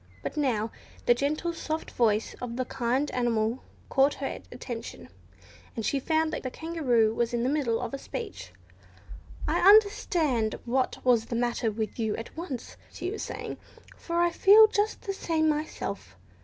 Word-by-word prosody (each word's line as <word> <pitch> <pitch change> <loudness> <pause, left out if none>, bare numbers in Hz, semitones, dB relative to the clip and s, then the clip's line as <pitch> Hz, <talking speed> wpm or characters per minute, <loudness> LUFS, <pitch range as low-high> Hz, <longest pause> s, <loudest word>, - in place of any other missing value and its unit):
But - - -4
now 230 -7 0 0.3
the 240 - +6
gentle, 305 +7 -1
soft 320 -1 -4
voice 220 -2 +1
of 240 -2 -4
the 255 +1 -1
kind 255 +4 -1
animal 235 -1 0 0.3
caught 275 +2 +3
her 275 - -4
attention, 230 - -7 0.7
and 225 - -3
she 280 - +1
found 315 +2 +1
the 260 - -3
Kangaroo 250 -9 +1
was 235 +1 0
in 235 - 0
the 250 - +1
middle 270 -6 +1
of 245 -1 -4
a 275 - -3
speech. 450 - -7 1.0
"I - - +1
understood 350 - +4
what 255 +2 0
was 240 -3 +4
the 235 - -4
matter 240 -1 0
with 215 +1 -4
you 220 -2 0
at 225 - -8
once," 320 -7 -6
she 360 - -4
was 435 - -5
saying, - - -5 0.4
"for 340 0 -3
I 345 0 +3
feel 415 +5 +8
just 430 0 0
the 395 -4 -2
same 320 -4 0
myself. 295 - -3
260 Hz, 165 wpm, -28 LUFS, 230-320 Hz, 1.0 s, feel